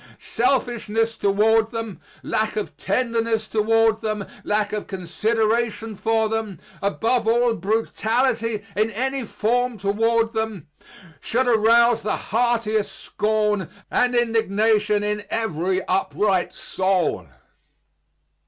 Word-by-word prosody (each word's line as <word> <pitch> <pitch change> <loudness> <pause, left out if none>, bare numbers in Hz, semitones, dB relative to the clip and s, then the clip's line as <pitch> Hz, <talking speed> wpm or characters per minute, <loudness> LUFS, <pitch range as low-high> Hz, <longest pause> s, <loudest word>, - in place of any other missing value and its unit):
Selfishness 230 -3 0
toward 220 +2 +2
them, 225 -4 -6 0.2
lack 215 0 -1
of 210 - -4
tenderness 230 0 -1
toward 225 0 +2
them, 215 -2 -2 0.2
lack 210 0 0
of 210 - -3
consideration 220 +5 -1
for 220 +2 +1
them, 220 -4 -3 0.2
above 225 +4 0
all, 240 +1 +3
brutality 225 +2 0
in 215 +2 +2
any 265 +4 -2
form 240 +2 -1
toward 225 +4 +1
them, 220 -6 -3 0.5
should 250 - 0
arouse 230 0 +4
the 210 - -1
heartiest 225 -2 +1
scorn 210 -3 -1 0.2
and 250 0 +2
indignation 215 -2 +2
in 210 0 -2
every 190 -4 -1
upright 190 0 +1
soul. 185 - -1
220 Hz, 105 wpm, -22 LUFS, 210-230 Hz, 0.5 s, arouse